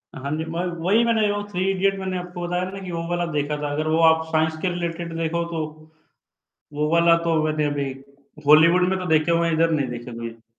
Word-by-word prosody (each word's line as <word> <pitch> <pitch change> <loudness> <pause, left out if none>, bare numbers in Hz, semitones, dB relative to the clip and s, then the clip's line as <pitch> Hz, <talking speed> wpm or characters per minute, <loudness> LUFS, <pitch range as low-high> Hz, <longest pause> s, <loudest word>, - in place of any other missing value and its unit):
हाँ 135 +2 -5
जी, 160 - -3
मगर 175 +2 -2 0.2
वही 215 +5 +4
मैंने 225 -2 +2
जो 205 0 -1
थ्री 190 0 0
इडियट 195 +1 0
मैंने 190 -1 -3
आपको 180 0 -7
बताया 180 +1 -1
ना 195 +1 -7
कि 180 - -6
वो 165 -1 -3
वाला 175 0 0
देखा 150 +1 -1
था 145 - -2
अगर 155 +2 -2
वो 160 +1 +2
आप 160 0 +4
साइंस 160 0 +1
के 185 - 0
रिलेटेड 170 -1 -4
देखो 165 +1 -1
तो। 165 -2 -2 1.1
वो 150 +1 -1
वाला 170 0 +5
तो 165 - +2
मैंने 155 0 0
अभी 145 -1 -2 0.6
हॉलीवुड 165 +4 +6
में 190 0 0
तो 185 - -5
देखे 160 0 +2
हुए 170 0 +2
हैं 165 - +1
इधर 165 +1 +2
नहीं 145 -5 0
देखे 120 0 -7
कभी। 115 0 -9
165 Hz, 225 wpm, -23 LUFS, 155-180 Hz, 1.1 s, हॉलीवुड